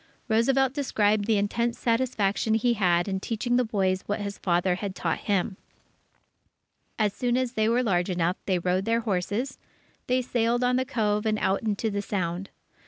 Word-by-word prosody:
Roosevelt 255 Hz, +4 st, +2 dB
described 215 Hz, -7 st, +1 dB
the 220 Hz, -1 st, +2 dB
intense 235 Hz, +4 st, 0 dB
satisfaction 230 Hz, -3 st, +1 dB
he 235 Hz, +2 st, +2 dB
had 175 Hz, -4 st, +2 dB
in 190 Hz, -1 st, -1 dB
teaching 230 Hz, +4 st, -1 dB
the 250 Hz, -, +3 dB
boys 190 Hz, -4 st, 0 dB
what 205 Hz, +1 st, -1 dB
his 200 Hz, -1 st, -5 dB
father 175 Hz, 0 st, +1 dB
had 195 Hz, +1 st, -4 dB
taught 165 Hz, -2 st, -1 dB
him. 195 Hz, 0 st, +1 dB, 1.4 s
As 210 Hz, -2 st, +1 dB
soon 245 Hz, +2 st, 0 dB
as 255 Hz, -1 st, -1 dB
they 220 Hz, -2 st, +1 dB
were 240 Hz, +2 st, +2 dB
large 180 Hz, -5 st, +1 dB
enough, 175 Hz, 0 st, 0 dB
they 190 Hz, -2 st, +2 dB
rode 180 Hz, +2 st, 0 dB
their 230 Hz, +1 st, +1 dB
horses, 215 Hz, +5 st, -2 dB, 0.5 s
they 255 Hz, 0 st, +1 dB
sailed 240 Hz, 0 st, +1 dB
on 250 Hz, 0 st, +2 dB
the 260 Hz, +1 st, +1 dB
Cove 210 Hz, -3 st, 0 dB
and 215 Hz, 0 st, +1 dB
out 195 Hz, -1 st, +1 dB
into 220 Hz, 0 st, -1 dB
the 200 Hz, 0 st, -1 dB
Sound. 185 Hz, -2 st, -3 dB
210 Hz, 175 wpm, -26 LUFS, 190-235 Hz, 1.4 s, the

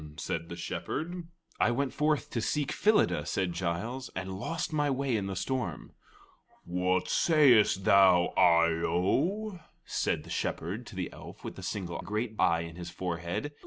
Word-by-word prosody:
said 85 Hz, +1 st, -3 dB
the 85 Hz, -, -5 dB
Shepherd. 165 Hz, -, -4 dB, 0.3 s
"I -, -, +4 dB
went 135 Hz, +3 st, -1 dB
forth 150 Hz, -1 st, 0 dB
to 115 Hz, -, -1 dB
seek 145 Hz, +5 st, -1 dB
Phyllida," 210 Hz, +1 st, +3 dB
said 95 Hz, -3 st, -1 dB
Giles, 110 Hz, +10 st, -3 dB
"and 95 Hz, 0 st, -4 dB
lost 160 Hz, -, -3 dB
my 145 Hz, -1 st, +1 dB
way 135 Hz, -2 st, 0 dB
in 100 Hz, -3 st, -1 dB
the 95 Hz, -, -4 dB
storm." 105 Hz, -, -3 dB, 0.7 s
"What 90 Hz, +1 st, 0 dB
sayest 125 Hz, -, +4 dB
thou, 95 Hz, -3 st, +5 dB
Eye 85 Hz, -2 st, +4 dB
o?" 180 Hz, -, 0 dB, 0.3 s
said -, -, -1 dB
the -, -, -11 dB
Shepherd 105 Hz, +9 st, -3 dB
to 105 Hz, -, -10 dB
the 90 Hz, -2 st, -4 dB
elf -, -, -11 dB
with -, -, -6 dB
the -, -, -9 dB
single 90 Hz, -4 st, -4 dB
great 105 Hz, +5 st, -3 dB
eye 85 Hz, -2 st, +3 dB
in 85 Hz, 0 st, -8 dB
his 85 Hz, -1 st, -6 dB
forehead. 85 Hz, -, -3 dB
100 Hz, 160 wpm, -30 LUFS, 90-140 Hz, 0.7 s, thou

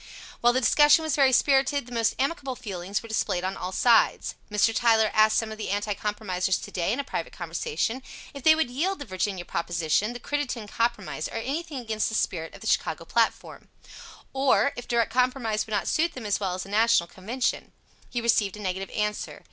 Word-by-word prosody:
While 240 Hz, 0 st, +4 dB
the 260 Hz, -, +2 dB
discussion 295 Hz, +6 st, +5 dB
was 315 Hz, -3 st, 0 dB
very 275 Hz, -2 st, +4 dB
spirited, 270 Hz, +1 st, +3 dB
the 245 Hz, -, -14 dB
most 230 Hz, -1 st, +1 dB
amicable 275 Hz, -2 st, -2 dB
feelings 200 Hz, -4 st, -4 dB
were -, -, -9 dB
displayed 185 Hz, -5 st, -1 dB
on 190 Hz, +1 st, -2 dB
all 185 Hz, -, -5 dB
sides. 230 Hz, +3 st, +3 dB, 0.2 s
Mr. 210 Hz, +2 st, +2 dB
Tyler 225 Hz, -3 st, +3 dB
asked 215 Hz, 0 st, +4 dB
some 225 Hz, -1 st, -1 dB
of 220 Hz, -, -8 dB
the -, -, -4 dB
Anti 205 Hz, +1 st, -1 dB
Compromisers 190 Hz, -3 st, -1 dB
to -, -, -9 dB
day, 175 Hz, +1 st, -1 dB
in 245 Hz, -, -1 dB
a -, -, -1 dB
private 170 Hz, -, -4 dB
conversation, 170 Hz, -, -3 dB, 0.3 s
if 280 Hz, -, -8 dB
they 315 Hz, +3 st, +6 dB
would 315 Hz, -6 st, 0 dB
yield 360 Hz, +10 st, -1 dB
the 285 Hz, -, -7 dB
Virginia 185 Hz, -3 st, -3 dB
proposition, 170 Hz, +6 st, 0 dB
the 245 Hz, -, -7 dB
Crittenden 260 Hz, -6 st, -3 dB
Compromise, 235 Hz, +3 st, -2 dB
or -, -, -10 dB
anything 285 Hz, +6 st, -4 dB
against 220 Hz, -3 st, -1 dB
the 220 Hz, -, -4 dB
spirit 165 Hz, -6 st, -2 dB
of -, -, -13 dB
the -, -, -9 dB
Chicago -, -, 0 dB
Platform. -, -, -1 dB, 0.7 s
Or 270 Hz, +1 st, +3 dB
if 245 Hz, -, -8 dB
direct 235 Hz, -2 st, +1 dB
compromise 250 Hz, -4 st, +1 dB
would 220 Hz, -, -6 dB
not 200 Hz, -, -1 dB
suit 335 Hz, +2 st, +1 dB
them 250 Hz, -4 st, -8 dB
as 205 Hz, -, 0 dB
well 190 Hz, -3 st, -2 dB
as 185 Hz, -, -5 dB
a -, -, -12 dB
National 220 Hz, -3 st, +3 dB
convention. 225 Hz, +8 st, -3 dB, 0.4 s
He 240 Hz, -, -2 dB
received 210 Hz, -4 st, +1 dB
a -, -, -10 dB
negative 190 Hz, -1 st, -3 dB
answer. 210 Hz, 0 st, -2 dB
225 Hz, 205 wpm, -26 LUFS, 200-260 Hz, 0.7 s, they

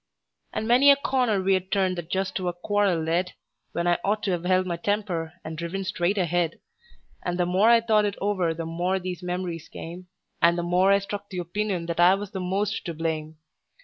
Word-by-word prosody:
And 220 Hz, -, -3 dB
many 255 Hz, +4 st, +6 dB
a 280 Hz, -, +9 dB
corner 255 Hz, -6 st, +1 dB
we'd 190 Hz, 0 st, +1 dB
turned 190 Hz, -2 st, +2 dB
that 165 Hz, -1 st, -8 dB
just 190 Hz, +1 st, -1 dB
to 185 Hz, -2 st, -2 dB
a 175 Hz, -, 0 dB
quarrel 200 Hz, 0 st, +1 dB
led, 175 Hz, +3 st, 0 dB, 0.4 s
When 170 Hz, -, -1 dB
I 175 Hz, 0 st, +2 dB
ought 210 Hz, +2 st, 0 dB
to 190 Hz, -3 st, +1 dB
've 175 Hz, 0 st, -7 dB
held 185 Hz, 0 st, +3 dB
my 175 Hz, -2 st, -2 dB
temper, 175 Hz, -4 st, -2 dB
and 160 Hz, 0 st, -5 dB
driven 170 Hz, +4 st, -4 dB
straight 185 Hz, +1 st, 0 dB
ahead; 175 Hz, -2 st, 0 dB, 0.6 s
And 175 Hz, 0 st, -2 dB
the 180 Hz, -, +2 dB
more 185 Hz, +5 st, +3 dB
I 235 Hz, -1 st, +6 dB
thought 215 Hz, -2 st, +3 dB
it 205 Hz, -1 st, -1 dB
over 190 Hz, -5 st, 0 dB
the 165 Hz, 0 st, -4 dB
more 175 Hz, +3 st, -1 dB
these 180 Hz, -1 st, -5 dB
memories 180 Hz, -2 st, -4 dB
came, 175 Hz, +2 st, -8 dB, 0.3 s
And 170 Hz, +1 st, +5 dB
the 175 Hz, -, -1 dB
more 180 Hz, +3 st, +3 dB
I 200 Hz, -, +6 dB
struck 200 Hz, 0 st, -6 dB
the 185 Hz, -, -6 dB
opinion 180 Hz, 0 st, -2 dB
that 170 Hz, 0 st, -4 dB
I 180 Hz, +2 st, +7 dB
was 200 Hz, 0 st, -6 dB
the 190 Hz, -, -4 dB
most 195 Hz, +4 st, -1 dB
to 170 Hz, -3 st, -4 dB
blame. 160 Hz, -1 st, -3 dB
185 Hz, 215 wpm, -25 LUFS, 175-200 Hz, 0.6 s, a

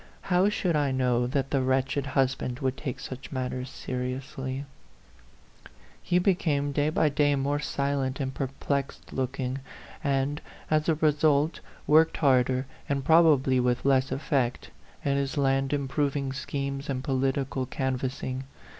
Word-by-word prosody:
How 185 Hz, +3 st, +5 dB
should 180 Hz, -5 st, 0 dB
I 145 Hz, -2 st, +2 dB
know 125 Hz, -2 st, +1 dB
that 135 Hz, +1 st, -1 dB
the 135 Hz, -, +2 dB
wretched 135 Hz, +2 st, 0 dB
husband 130 Hz, -2 st, +1 dB
would 130 Hz, 0 st, -1 dB
take 135 Hz, -4 st, -5 dB
such 130 Hz, 0 st, -8 dB
matters 130 Hz, -1 st, -3 dB
seriously? 130 Hz, +1 st, -4 dB, 1.4 s
He 175 Hz, -, +1 dB
became 160 Hz, -6 st, +1 dB
day 145 Hz, +1 st, +1 dB
by 155 Hz, 0 st, +2 dB
day 145 Hz, 0 st, +2 dB
more 140 Hz, +2 st, 0 dB
silent 140 Hz, -2 st, -1 dB
and 135 Hz, -1 st, -2 dB
perplexed 135 Hz, 0 st, -3 dB
looking; 130 Hz, 0 st, -2 dB, 0.4 s
and, 140 Hz, +1 st, 0 dB, 0.3 s
as 155 Hz, +1 st, +2 dB
a 160 Hz, -, +4 dB
result, 150 Hz, 0 st, +2 dB, 0.3 s
worked 160 Hz, +2 st, +5 dB
harder, 130 Hz, -2 st, +3 dB, 0.2 s
and 140 Hz, -1 st, -1 dB
probably 150 Hz, -6 st, +5 dB
with 125 Hz, 0 st, +1 dB
less 135 Hz, -1 st, +3 dB
effect, 135 Hz, -3 st, -1 dB, 0.3 s
at 140 Hz, -1 st, +2 dB
his 140 Hz, +1 st, -2 dB
land 135 Hz, -1 st, +2 dB
improving 140 Hz, -1 st, -1 dB
schemes 140 Hz, +1 st, -4 dB
and 130 Hz, -1 st, -2 dB
political 135 Hz, -1 st, 0 dB
can 130 Hz, 0 st, -1 dB
vassing. 130 Hz, 0 st, -4 dB
135 Hz, 135 wpm, -27 LUFS, 130-145 Hz, 1.4 s, How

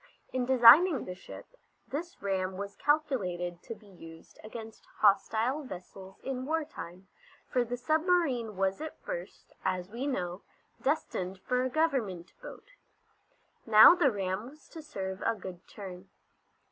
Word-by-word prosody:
In 255 Hz, -1 st, -1 dB
designing 265 Hz, +5 st, +7 dB
the 180 Hz, -, -5 dB
ship 180 Hz, -, -11 dB, 0.4 s
this 335 Hz, -, -6 dB
ram 190 Hz, -1 st, -1 dB
was 200 Hz, 0 st, -6 dB
calculated 185 Hz, -, 0 dB
to 230 Hz, -, -7 dB
be 210 Hz, 0 st, -20 dB
used 165 Hz, -4 st, -14 dB
against 220 Hz, 0 st, -10 dB
hostile 220 Hz, +6 st, +2 dB
vessels 190 Hz, -3 st, -10 dB
in 260 Hz, -1 st, -3 dB
war 320 Hz, 0 st, 0 dB
time, 185 Hz, -, -10 dB, 0.4 s
for 250 Hz, -, +1 dB
the 245 Hz, +1 st, -4 dB
submarine 310 Hz, -, +1 dB
was 195 Hz, +5 st, 0 dB
at 315 Hz, -, -7 dB
first, -, -, -7 dB
as 185 Hz, 0 st, -2 dB
we 245 Hz, +5 st, -3 dB
know, 180 Hz, -8 st, -3 dB, 0.4 s
destined 195 Hz, -, -1 dB
for 250 Hz, +5 st, 0 dB
a 260 Hz, -, 0 dB
Government 245 Hz, -, -1 dB
boat. -, -, -11 dB, 1.0 s
Now 220 Hz, +6 st, +10 dB
the 350 Hz, -6 st, +3 dB
ram 195 Hz, +2 st, -3 dB
was 300 Hz, +2 st, -18 dB
to 325 Hz, -, -9 dB
serve 190 Hz, -11 st, -5 dB
a -, -, +1 dB
good 185 Hz, -3 st, -9 dB
turn. 190 Hz, -2 st, -10 dB
220 Hz, 145 wpm, -30 LUFS, 190-280 Hz, 1.0 s, Now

